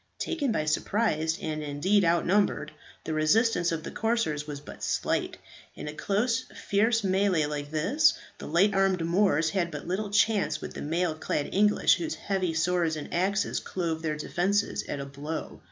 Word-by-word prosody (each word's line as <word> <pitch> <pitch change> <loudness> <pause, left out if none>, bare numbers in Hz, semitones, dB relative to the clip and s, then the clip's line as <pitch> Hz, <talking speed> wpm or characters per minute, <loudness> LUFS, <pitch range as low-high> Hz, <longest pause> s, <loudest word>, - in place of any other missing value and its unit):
Taken 290 -7 -1
by 155 -8 0
surprise, 160 -1 0
and 155 -1 -3
indeed 150 +8 +1
outnumbered, 170 -1 +2 0.3
the 160 - -3
resistance 175 +4 +2
of 160 -1 -3
the - - -6
corsairs 215 -10 -1
was 145 -1 -5
but 145 - -11
slight. - - -1 0.4
In - - -7
a 150 - -5
close 230 +9 0
fierce 220 +3 +1
mˆl‚e 190 -5 +2
like 145 -1 -4
this 285 - +3 0.2
the - - -7
light 195 +4 +3
armed 195 -3 +2
Moors 170 -3 +2
had 185 -4 0
but 150 -1 -7
little 200 +4 -2
chance 205 -6 +2
with - - -7
the - - -7
mail 165 +2 0
clad 155 -2 -3
English, 210 +2 +4
whose 325 -2 -3
heavy 185 -4 -2
swords 165 -1 +1
and 150 - -7
axes 195 +4 0
clove 165 -3 -3
their 155 -2 -2
defences 195 +7 0
at 145 - -3
a 140 - -4
blow. 145 +3 -6
175 Hz, 170 wpm, -28 LUFS, 155-205 Hz, 0.4 s, English